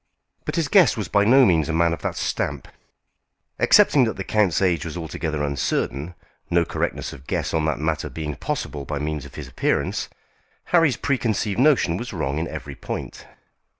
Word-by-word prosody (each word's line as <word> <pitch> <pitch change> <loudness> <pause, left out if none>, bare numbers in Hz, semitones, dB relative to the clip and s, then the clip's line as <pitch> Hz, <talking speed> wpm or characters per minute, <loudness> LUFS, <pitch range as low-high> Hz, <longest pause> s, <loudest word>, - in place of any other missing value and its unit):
But - - -3
his 165 -4 +1
guest 175 - +5
was 105 - -3
by 100 -1 +3
no 130 +4 +6
means 80 -6 +2
a - - 0
man 85 +1 +3
of 85 - -6
that - - -3
stamp. - - -2 0.9
Excepting 150 -11 +5
that 110 - -3
the 95 - -3
count's 100 -4 +2
age 90 -5 +1
was 80 +1 -6
altogether 80 -2 -3
uncertain, 70 +3 -2 0.3
no 85 -1 +3
correctness - - -3
of 70 0 -13
guess - - -2
on 80 -1 +1
that 80 -2 0
matter 80 +1 -2
being 75 -2 -4
possible 70 +2 -4
by 75 +1 -4
means 75 -1 -3
of 70 - -13
his - - -7
appearance, - - -1 0.6
Harry's 165 -7 +4
preconceived 110 -6 -1
notion 130 - +3
was 120 +2 -6
wrong 75 -4 -2
in 80 - -2
every - - -7
point. - - -7
85 Hz, 185 wpm, -23 LUFS, 75-110 Hz, 0.9 s, no